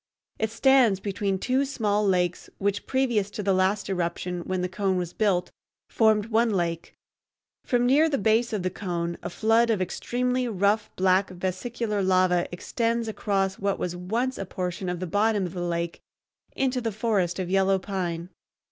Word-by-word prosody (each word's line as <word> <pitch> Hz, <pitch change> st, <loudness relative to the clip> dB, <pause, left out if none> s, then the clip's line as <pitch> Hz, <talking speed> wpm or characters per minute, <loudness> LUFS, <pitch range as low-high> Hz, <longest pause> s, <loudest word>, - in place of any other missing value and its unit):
It 220 Hz, -, 0 dB
stands 245 Hz, -4 st, +4 dB
between 200 Hz, -1 st, -1 dB
two 255 Hz, +7 st, +1 dB
small 215 Hz, -7 st, 0 dB
lakes 180 Hz, -3 st, 0 dB
which 200 Hz, 0 st, -1 dB
previous 240 Hz, -7 st, +1 dB
to 210 Hz, -, -5 dB
the 195 Hz, 0 st, +2 dB
last 190 Hz, +2 st, +1 dB
eruption, 180 Hz, -1 st, -2 dB
when 185 Hz, -1 st, -1 dB
the -, -, +1 dB
cone 190 Hz, 0 st, -1 dB
was 175 Hz, -1 st, -3 dB
built, 195 Hz, -5 st, +1 dB, 0.4 s
formed 215 Hz, -2 st, +3 dB
one 230 Hz, +2 st, +3 dB
lake. 170 Hz, -5 st, -2 dB, 0.7 s
From 245 Hz, -1 st, +1 dB
near 295 Hz, +6 st, +4 dB
the 280 Hz, -, 0 dB
base 225 Hz, +3 st, +2 dB
of 210 Hz, -4 st, -2 dB
the 185 Hz, -, -1 dB
cone 170 Hz, -3 st, -3 dB
a -, -, -4 dB
flood 225 Hz, +5 st, +2 dB
of 220 Hz, -4 st, +2 dB
extremely 250 Hz, +7 st, -1 dB
rough 210 Hz, 0 st, +1 dB
black 190 Hz, +1 st, +3 dB
vesicular 200 Hz, +4 st, -3 dB
lava 185 Hz, -2 st, +3 dB
extends 230 Hz, +5 st, -1 dB
across 195 Hz, -3 st, -1 dB
what 200 Hz, 0 st, 0 dB
was 180 Hz, -1 st, -3 dB
once 230 Hz, +9 st, -2 dB
a 195 Hz, -, -3 dB
portion 180 Hz, 0 st, -3 dB
of 180 Hz, -1 st, -3 dB
the 185 Hz, -, -3 dB
bottom 205 Hz, +2 st, +1 dB
of 175 Hz, -, -6 dB
the 180 Hz, -, -4 dB
lake 170 Hz, -1 st, -2 dB, 0.5 s
into 260 Hz, -1 st, 0 dB
the 225 Hz, -1 st, -1 dB
forest 200 Hz, -5 st, 0 dB
of 185 Hz, -1 st, -3 dB
yellow 195 Hz, 0 st, +3 dB
pine. 180 Hz, -3 st, -4 dB
195 Hz, 175 wpm, -26 LUFS, 185-225 Hz, 0.7 s, stands